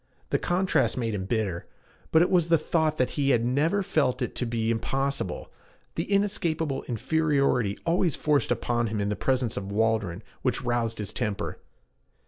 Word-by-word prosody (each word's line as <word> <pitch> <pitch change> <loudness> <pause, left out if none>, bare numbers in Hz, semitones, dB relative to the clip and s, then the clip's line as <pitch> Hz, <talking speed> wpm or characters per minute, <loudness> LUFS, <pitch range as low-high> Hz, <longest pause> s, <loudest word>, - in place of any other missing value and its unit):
The - - +2
contrast 185 -4 +1
made 115 -3 -1
him 95 -2 -3
bitter; 100 -5 -2 0.4
but 160 +1 +6
it - - 0
was 175 -3 +3
the 165 - +6
thought 155 -1 0
that 130 - +1
he 140 -2 0
had 120 -3 +3
never 155 +11 +1
felt 130 -7 +1
it 120 - -3
to 125 - -1
be 115 -1 0
impossible, 135 -2 -2 0.4
the 165 - -2
inescapable 170 -8 0
inferiority 140 -4 +1
always 170 -2 +2
forced 150 -2 +1
upon 120 -1 0
him 105 0 -2
in 100 0 0
the 105 - -1
presence 130 -2 0
of 100 0 -4
Waldron, 110 -4 0 0.2
which - - 0
roused 120 -2 -1
his 105 -3 -5
temper. 105 0 -3
125 Hz, 170 wpm, -27 LUFS, 110-160 Hz, 0.4 s, but